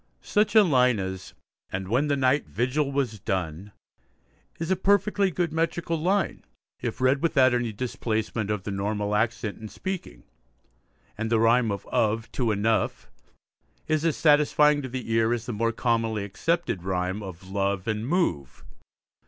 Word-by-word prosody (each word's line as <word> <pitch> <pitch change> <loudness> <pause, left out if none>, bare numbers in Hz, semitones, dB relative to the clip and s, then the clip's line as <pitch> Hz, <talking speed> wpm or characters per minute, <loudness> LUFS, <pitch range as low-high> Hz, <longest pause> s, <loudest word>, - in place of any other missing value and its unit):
Such 210 +1 +1
a 215 - +9
line 125 - +3
as 95 0 -6 0.4
And 95 0 -4
when 130 +8 +1
the 145 -1 +1
night 135 +2 +2
vigil 135 +4 0
was 130 -6 -1
done, 95 +1 -3 0.9
is 165 +2 -2
a - - +4
perfectly 200 +1 +2
good 175 -2 -2
metrical 165 +1 -1
line 180 +3 0 0.4
if - - -4
read 130 +2 +2
without 135 -6 +4
any 120 -2 0
displacement 110 -1 -3
of 105 -3 -2
the 105 - -4
normal 105 +1 -2
accent 110 0 -1
in 110 - -7
speaking, 185 - -6 1.0
and 110 0 -1
the 115 - +4
rhyme 115 +1 +4
of 100 - -5
'of' 110 +1 0
to 120 -4 0
'enough' 110 +2 0 0.8
is 155 -1 +1
as 165 -3 +1
satisfying 150 -1 +4
to 130 - -6
the 125 -2 -5
ear 115 +1 +3
as 115 -1 -7
the 120 - -4
more 115 +2 0
commonly 115 -2 0
accepted 135 - -1
rhyme 90 +2 -2
of 95 -1 -9
'love' 100 -1 -1
and 110 +1 -2
'move.' 110 - -1
115 Hz, 160 wpm, -26 LUFS, 105-150 Hz, 1.0 s, a